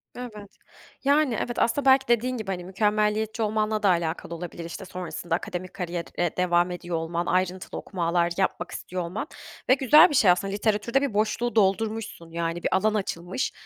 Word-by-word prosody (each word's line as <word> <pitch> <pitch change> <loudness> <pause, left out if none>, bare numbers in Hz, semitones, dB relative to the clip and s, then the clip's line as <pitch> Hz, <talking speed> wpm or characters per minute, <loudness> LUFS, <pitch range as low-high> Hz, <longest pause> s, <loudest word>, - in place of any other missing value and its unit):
Evet, 215 -5 -8 0.5
yani, 280 -3 +3
evet, 240 - -3
aslında 255 +5 +1
belki 265 -1 +5
dediğin 240 +2 +1
gibi, 215 -3 -6
hani, 180 -2 -4
mükemmeliyetçi 210 +3 0
olmanla 215 0 0
da 200 - +5
alakalı 170 -1 -1
olabilir, 170 0 -7
işte, 175 +3 -7
sonrasında 180 -2 -4
akademik 180 +1 -5
kariyere 175 -1 -3
devam 175 0 +2
ediyor 175 -1 -4
olman, 170 +1 -2
ayrıntılı 185 +1 -1
okumalar 170 -2 0
yapmak 185 -2 -1
istiyor 180 0 -5
olman 185 - -4 0.4
ve - - +8
güzel 300 +6 +7
bir 295 - -2
şey 195 -8 +6
aslında, 195 +2 0
literatürde 215 +5 +1
bir 280 -6 -1
boşluğu 220 +3 0
doldurmuşsun, 215 -3 0
yani, 170 0 -3
bir - - +1
alan 215 +3 +2
açılmış 185 +1 -2
195 Hz, 165 wpm, -26 LUFS, 175-225 Hz, 0.5 s, ve